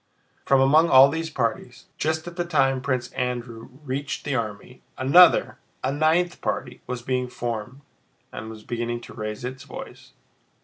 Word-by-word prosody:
From 135 -1 +4
among 155 +5 +5
all 135 +1 +8
these 160 +2 -3
parties, 120 -3 -3
just 160 +1 -1
at 175 0 -8
the 175 - -1
time 135 -6 +1
Prince 130 -2 -2
Andrew 120 -2 -4
reached 140 +1 -4
the 145 - -1
army, 115 +1 -4 0.2
another, 160 +8 +5 0.2
a - - 0
ninth 160 +4 +1
party, 125 -2 -3
was 125 -1 -5
being 125 0 -1
formed 120 +1 -5 0.5
and 110 - -7
was 110 -1 -10
beginning 120 0 -3
to - - -12
raise 110 +2 -5
its 130 +1 -6
voice. - - -10
130 Hz, 160 wpm, -24 LUFS, 120-145 Hz, 0.5 s, all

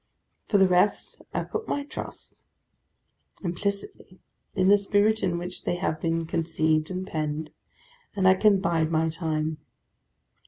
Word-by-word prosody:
For 205 - +3
the 190 -1 +6
rest, 180 +3 +1
I - - -1
put 445 0 -5
my 285 - -1
trust, - - -8 1.0
implicitly, 190 0 -4 0.4
in 185 - +2
the 205 +1 +7
spirit 205 +2 +2
in 180 -3 0
which 180 +1 -5
they - - 0
have 160 -3 -2
been 165 0 0
conceived 160 -1 0
and 185 0 -4
penned; 155 -2 -3 0.6
and 190 -2 +3
I 185 - +8
can 200 +1 +4
bide 165 -3 +1
my 160 0 +1
time. 155 -1 -2
175 Hz, 145 wpm, -26 LUFS, 160-195 Hz, 1.0 s, I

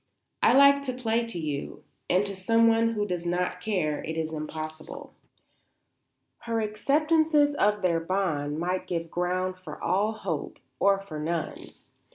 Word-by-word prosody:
"I - - +5
like 280 +1 +7
to 255 - -2
play 235 -2 -1
to 230 - -5
you; 150 -4 -4 0.3
and 185 +3 +3
to 200 -1 -5
someone 230 +3 +3
who 210 -2 -1
does 180 -4 -3
not 180 +1 -1
care 180 -8 -1
it 160 0 -4
is 160 0 -2
impossible." 155 0 -7 1.3
Her 230 -1 -2
acceptances 295 +7 +2
of 210 0 +2
their 170 -2 +2
bond 165 -5 -1
might 180 +3 -2
give 165 -2 -3
ground 185 +1 -1
for 185 - -9
all 210 +3 +1
hope 190 -8 -4 0.2
or 195 0 +3
for 160 -6 -7
none. 160 +1 -3
185 Hz, 150 wpm, -27 LUFS, 165-225 Hz, 1.3 s, like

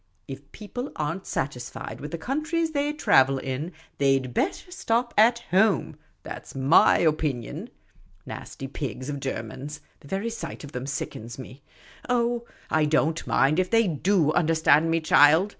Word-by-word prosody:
If 140 +1 -9
people 245 +5 -6
are 150 +1 -1
n't 190 +2 -10
satisfied 125 -3 -4
with 150 - -5
the 170 - -4
countries 315 - -1
they 290 -1 0
trav^el 135 - +3
in, 135 +6 -4 0.3
they 135 -1 +4
'd 130 -2 -6
better 360 +4 -2
stop 240 -8 -1
at 235 +2 +4
home 195 -4 +3
— - - -41
that - - -8
's - - -12
my 135 +4 +5
opinion. 150 -7 -1 0.6
Nasty 135 - -7
pigs 135 -1 -5
of 140 -1 -3
Germans! 135 +3 -5 0.2
The - - -16
very 195 +8 -2
sight 165 -9 -7
of 145 - -9
them 125 0 -5
sickens 120 -4 -5
me. 130 +1 -10 0.5
Oh, 240 -1 +1 0.3
I 155 -1 +3
don't 155 +2 +1
mind 150 +5 +3
if 185 0 +1
they 230 -2 +4
do 170 0 +2
understand 160 -2 +3
me, 165 0 +1
child. 155 +5 +5
155 Hz, 165 wpm, -26 LUFS, 135-220 Hz, 0.6 s, my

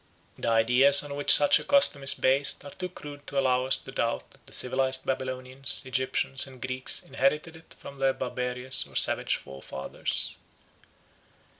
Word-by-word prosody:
The - - -7
ideas 125 +6 +4
on 145 -1 -8
which 145 0 -5
such 145 - +8
a - - -8
custom 280 - +2
is 135 - +3
based 135 +2 0
are 140 - -10
too 180 0 -7
crude 145 -4 -12
to 140 - -6
allow 130 -1 0
us 130 - +2
to - - -13
doubt - - -4
that - - -24
the - - -16
civilised 130 +1 0
Babylonians, 130 +1 -3
Egyptians, 130 +1 -3
and 130 -1 -15
Greeks 130 0 -3
inherited 145 +5 -2
it 160 0 -16
from 140 -1 -13
their 135 0 +1
barbarous 125 0 -3
or - - -19
savage - - +2
forefathers. 65 0 -3
135 Hz, 165 wpm, -26 LUFS, 130-140 Hz, -, such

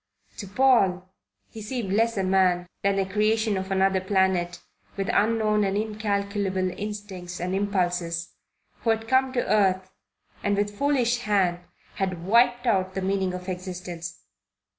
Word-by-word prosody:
To 200 - -6
Paul 195 -6 +3 0.4
he 220 - -9
seemed 215 -3 -3
less 225 +1 +2
a 195 - +1
man 185 -2 +2 0.2
than 200 0 +1
a 195 - +1
creation 215 +2 +1
of 190 0 -3
another 190 0 +2
planet, 185 -2 +1 0.4
with 195 +3 -1
unknown 215 -1 +2
and 195 0 0
incalculable 200 -3 -1
instincts 200 -4 -6
and 180 +1 -2
impulses, 180 -4 -1 0.5
who 230 - -2
had 225 0 +1
come 260 +2 +3
to 245 - 0
earth 190 -3 +2 0.5
and 205 0 +1
with 205 0 -1
foolish 250 -2 +1
hand 195 -6 +1 0.4
had 185 -3 -2
wiped 240 +4 +4
out 190 -5 +1
the 190 - -2
meaning 190 -1 0
of 180 0 -8
existence. 180 -2 -6
195 Hz, 145 wpm, -25 LUFS, 185-215 Hz, 0.5 s, wiped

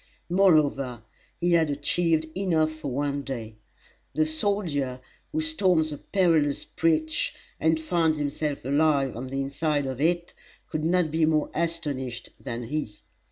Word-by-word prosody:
Moreover, 145 - +3 0.4
he 175 0 +1
had 165 -2 +4
achieved 160 +3 +1
enough 165 -5 +2
for 155 -1 -7
one 140 +2 -1
day. 115 -6 -6 0.6
The 155 +1 +3
soldier 155 -6 0 0.3
who 315 0 0
storms 185 - +2
a 145 - -6
perilous 160 -7 +2
breach 155 -1 0 0.2
and 160 0 +2
finds 160 -1 +1
himself 145 -1 -2
alive 140 -1 +2
on 125 +3 -5
the 135 +1 -3
inside 145 +1 0
of 130 0 -4
it 170 +2 +1 0.3
could 155 - -3
not 170 -1 +2
be 160 0 +3
more 155 -1 +1
astonished 145 -7 -3
than 120 -2 -5
he. 115 -5 -4
155 Hz, 140 wpm, -26 LUFS, 140-165 Hz, 0.6 s, had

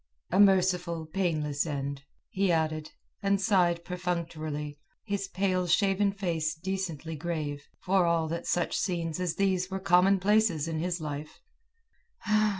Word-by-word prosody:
"A 185 - +2
merciful, 180 -4 +3
painless 155 -4 -1
end," 140 -1 -4 0.3
he 195 -3 +1
added, 155 -1 0 0.3
and 200 -1 +2
sighed 180 -4 +2
perfunctorily, 160 -5 -3 0.2
his 200 -2 -2
pale 185 -1 0
shaven 195 +3 +3
face 165 -6 -1
decently 165 -3 -4
grave, 150 -3 -4
for 185 -1 +2
all 165 -1 +2
that 170 +1 -4
such 175 - 0
scenes 170 -3 -1
as 180 -3 -1
these 190 -2 +1
were 190 0 -3
commonplaces 190 -1 +3
in 160 -1 -2
his 175 0 -2
life. 150 0 -6
175 Hz, 130 wpm, -29 LUFS, 155-190 Hz, 0.3 s, merciful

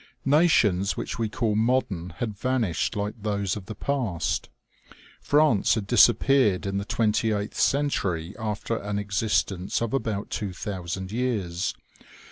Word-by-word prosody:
Nations 120 - +3
which - - -4
we 110 -2 0
call 115 -1 0
modern 110 -6 0
had 110 -4 -3
vanished 115 -5 -1
like 105 +2 -3
those 100 -2 -1
of 100 -3 -8
the 110 - -6
past. 115 - -2 0.7
France 145 -10 +3
had 110 -3 -2
disappeared 120 -1 +4
in 100 0 -1
the 100 - -4
twenty 110 0 +1
eighth 105 0 -3
cen 145 +1 +3
tury, 90 - -2
after 110 +1 -2
an 105 0 -3
existence 100 -2 0
of 115 0 -2
about 110 -6 -2
two 100 -3 -3
thousand 95 0 -5
years. 105 -7 -1
105 Hz, 140 wpm, -26 LUFS, 100-120 Hz, 0.7 s, disappeared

